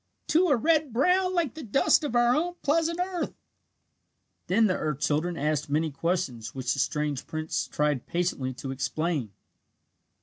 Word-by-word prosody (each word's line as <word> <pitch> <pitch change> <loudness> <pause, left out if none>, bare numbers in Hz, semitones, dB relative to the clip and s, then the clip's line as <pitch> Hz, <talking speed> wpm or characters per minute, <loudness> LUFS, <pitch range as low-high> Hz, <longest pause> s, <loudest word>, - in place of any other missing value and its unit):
Two 350 +4 +3
are 285 -6 +4
red 310 +2 +2
brown 365 +9 +2
like 330 -8 0
the 315 - -8
dust 255 +6 +3
of 285 -5 -2
our 240 +1 +4
own 350 +3 -1
pleasant 330 +3 +1
earth!" 360 -1 -2 1.1
Then 220 +5 +4
the 185 -4 +2
earth 150 -3 -2
children 155 +4 0
asked 150 0 -1
many 155 +2 +1
questions 135 -7 -2
which 130 0 -1
the 140 - -4
strange 150 -1 -1
prince 155 0 -2
tried 150 -4 -1
patiently 170 -7 -1
to 135 0 -6
explain. 145 -1 -2
175 Hz, 160 wpm, -27 LUFS, -, 1.1 s, are